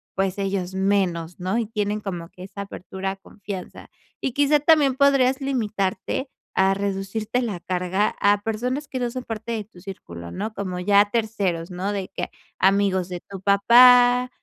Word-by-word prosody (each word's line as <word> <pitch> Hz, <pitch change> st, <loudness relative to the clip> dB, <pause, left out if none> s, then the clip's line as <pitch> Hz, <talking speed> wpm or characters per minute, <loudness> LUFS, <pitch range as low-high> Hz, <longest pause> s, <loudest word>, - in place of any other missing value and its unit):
pues, 195 Hz, 0 st, 0 dB
ellos 190 Hz, -2 st, -2 dB
menos, 190 Hz, -4 st, 0 dB
¿no? 185 Hz, +5 st, -1 dB
Y 230 Hz, -, -1 dB
tienen 210 Hz, -1 st, -2 dB
como 175 Hz, -4 st, -5 dB
que 180 Hz, -, -12 dB
esa 200 Hz, +1 st, -8 dB
apertura 190 Hz, -1 st, -5 dB
a -, -, -6 dB
confianza. 195 Hz, -1 st, -9 dB, 0.3 s
Y 265 Hz, -, -2 dB
quizá, 290 Hz, +2 st, +3 dB
también 295 Hz, -3 st, +5 dB
podrías 270 Hz, -1 st, +3 dB
limitarte, 225 Hz, -1 st, -2 dB, 0.3 s
a 190 Hz, 0 st, +3 dB
reducirte 200 Hz, +4 st, -2 dB
la 215 Hz, -7 st, -3 dB
carga, 185 Hz, +3 st, -1 dB
a 205 Hz, 0 st, +3 dB
personas 250 Hz, +6 st, -2 dB
que 260 Hz, -, -4 dB
no 245 Hz, -1 st, -1 dB
son 255 Hz, +1 st, -5 dB
parte 225 Hz, 0 st, -5 dB
de 220 Hz, -2 st, -2 dB
tu 195 Hz, -3 st, -18 dB
círculo, 85 Hz, -, -9 dB
¿no?, 215 Hz, +3 st, -4 dB
como 185 Hz, -3 st, -4 dB
ya 200 Hz, +2 st, +5 dB
a 205 Hz, -, 0 dB
terceros, 200 Hz, -7 st, -1 dB
¿no?, 185 Hz, +3 st, -3 dB
de 195 Hz, -2 st, -4 dB
que, -, -, -4 dB, 0.3 s
amigos 190 Hz, -1 st, +2 dB
de 180 Hz, -1 st, -5 dB
tu 195 Hz, -2 st, -8 dB
papá, 245 Hz, +5 st, +6 dB
200 Hz, 175 wpm, -23 LUFS, 190-235 Hz, 0.3 s, papá